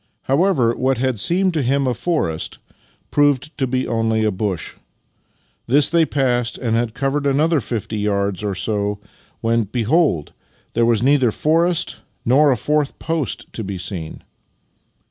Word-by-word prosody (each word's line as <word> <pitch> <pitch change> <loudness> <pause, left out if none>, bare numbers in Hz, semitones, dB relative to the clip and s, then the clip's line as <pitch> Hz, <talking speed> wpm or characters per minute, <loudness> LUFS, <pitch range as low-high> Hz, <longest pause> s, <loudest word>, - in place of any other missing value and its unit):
However, 135 -5 +2
what 130 0 +1
had 130 -2 -1
seemed 180 - +2
to 155 - 0
him 135 +2 +1
a 125 - +1
forest 120 - -2 0.5
proved 145 +1 +2
to 135 - +1
be 130 +1 -1
only 115 -1 +1
a 105 - +2
bush. 95 -3 -3 0.9
This 140 +4 +4
they 165 -1 +3
passed, 125 -4 0
and 115 -3 -1
had 115 -1 -1
covered 140 +1 0
another 150 +3 +2
fifty 110 -3 -4
yards 100 -1 -1
or 100 -2 -2
so 100 +2 -1 0.2
— - - -34
when, 115 0 +1
behold! 120 - +1 0.4
there 115 0 +2
was 115 -1 +2
neither 135 -2 +4
forest 165 +6 +1 0.3
nor 140 +4 +5
a 125 - +1
fourth 150 +3 0
post 160 -5 -3
to 110 - -4
be 100 -1 -5
seen! 90 -3 -6
125 Hz, 155 wpm, -20 LUFS, 110-145 Hz, 0.9 s, nor